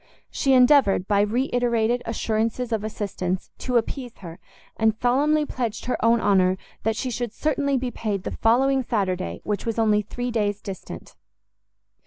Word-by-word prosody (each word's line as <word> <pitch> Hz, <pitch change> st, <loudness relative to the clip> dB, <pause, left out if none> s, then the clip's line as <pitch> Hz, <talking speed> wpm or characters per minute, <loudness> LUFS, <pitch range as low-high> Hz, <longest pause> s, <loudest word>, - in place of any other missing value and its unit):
She 270 Hz, -, +1 dB
endeavoured, 250 Hz, -7 st, +5 dB
by 200 Hz, -1 st, +3 dB
re 235 Hz, +6 st, +1 dB
iterated 240 Hz, -1 st, +1 dB
assurances 225 Hz, +2 st, -1 dB
of 220 Hz, -2 st, -1 dB
assistance, 195 Hz, -4 st, -3 dB
to 250 Hz, -2 st, 0 dB
appease 245 Hz, +1 st, -3 dB
her, 170 Hz, -2 st, -9 dB, 0.4 s
and 220 Hz, -1 st, +2 dB
solemnly 295 Hz, +5 st, +2 dB
pledged 235 Hz, -5 st, -4 dB
her 250 Hz, -, -2 dB
own 230 Hz, +1 st, +4 dB
honour 185 Hz, -3 st, +3 dB, 0.2 s
that 220 Hz, 0 st, 0 dB
she 255 Hz, +3 st, -3 dB
should 240 Hz, -1 st, -3 dB
certainly 280 Hz, -1 st, 0 dB
be 250 Hz, -1 st, -2 dB
paid 205 Hz, -5 st, -3 dB
the -, -, -4 dB
following 265 Hz, +4 st, +2 dB
Saturday, 190 Hz, -6 st, -2 dB
which 205 Hz, -2 st, -2 dB
was 230 Hz, -, -2 dB
only 215 Hz, -2 st, +3 dB
three 245 Hz, +4 st, -4 dB
days 205 Hz, -3 st, 0 dB
distant. 195 Hz, -3 st, -8 dB
225 Hz, 160 wpm, -24 LUFS, 205-250 Hz, 0.4 s, endeavoured